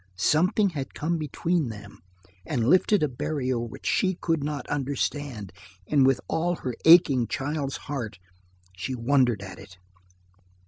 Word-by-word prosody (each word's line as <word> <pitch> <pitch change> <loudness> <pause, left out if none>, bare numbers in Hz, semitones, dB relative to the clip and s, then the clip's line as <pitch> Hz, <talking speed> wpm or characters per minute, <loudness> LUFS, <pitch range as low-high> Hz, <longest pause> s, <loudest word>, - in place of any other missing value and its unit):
Something 180 - +2
has 140 -5 -4
come 165 +2 -1
between 155 +1 -1
them 105 -2 -10 0.4
and 115 +3 -1
lifted 185 +4 +4
a - - +3
barrier 130 -1 -2
which 115 -1 -7
she 190 -1 +1
could 165 -4 -1
not 145 -3 -4
understand, 140 -6 -3 0.3
and 135 +4 +3
with 135 - +3
all 175 +2 0
her 130 -6 -4
aching 150 -8 +6
child's 140 0 -3
heart 120 -8 -4 0.6
she 115 +8 -4
wondered 120 -3 +2
at 95 - -9
it. 95 -1 -14
140 Hz, 140 wpm, -26 LUFS, 120-155 Hz, 0.6 s, aching